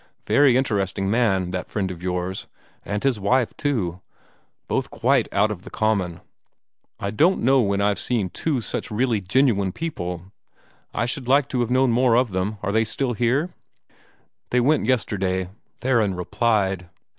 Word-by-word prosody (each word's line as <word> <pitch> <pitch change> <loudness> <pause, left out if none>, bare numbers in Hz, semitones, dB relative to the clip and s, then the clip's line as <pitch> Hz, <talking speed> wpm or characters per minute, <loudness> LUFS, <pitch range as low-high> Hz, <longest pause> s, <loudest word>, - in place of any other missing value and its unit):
Very 140 -4 +4
interesting 100 -6 0
man, 95 -6 +1
that 90 0 -4
friend 95 -3 -2
of 85 -2 -9
yours. 90 +1 -3 0.4
And 105 +1 -3
his 135 -5 +1
wife, 120 +5 +1
too 95 - -2 0.7
both 135 0 -1
quite 125 +1 +1
out 105 +2 +2
of 95 -4 -6
the - - -11
common. 100 -6 -1 0.8
I 100 - -3
don't 165 - +2
know 135 +2 +5
when 100 -2 0
I've 100 0 +1
seen 110 -7 -1
two 145 -6 -1
such - - -4
really 115 -1 0
genuine 100 -1 +2
people. 90 - -5 0.6
I 115 - -1
should 125 +1 -3
like 140 +1 +4
to 125 - -1
have 120 -1 0
known 130 0 +3
more 120 0 +3
of 125 -3 +2
them. 95 +3 -2
Are 100 - 0
they 110 +2 +3
still 120 +3 -1
here?" 130 - 0 1.0
"They 125 - +2
went 140 -1 +2
yesterday," 95 -7 0 0.3
Theron 115 -7 +2
replied. 95 -2 0
110 Hz, 160 wpm, -23 LUFS, 95-130 Hz, 1.0 s, know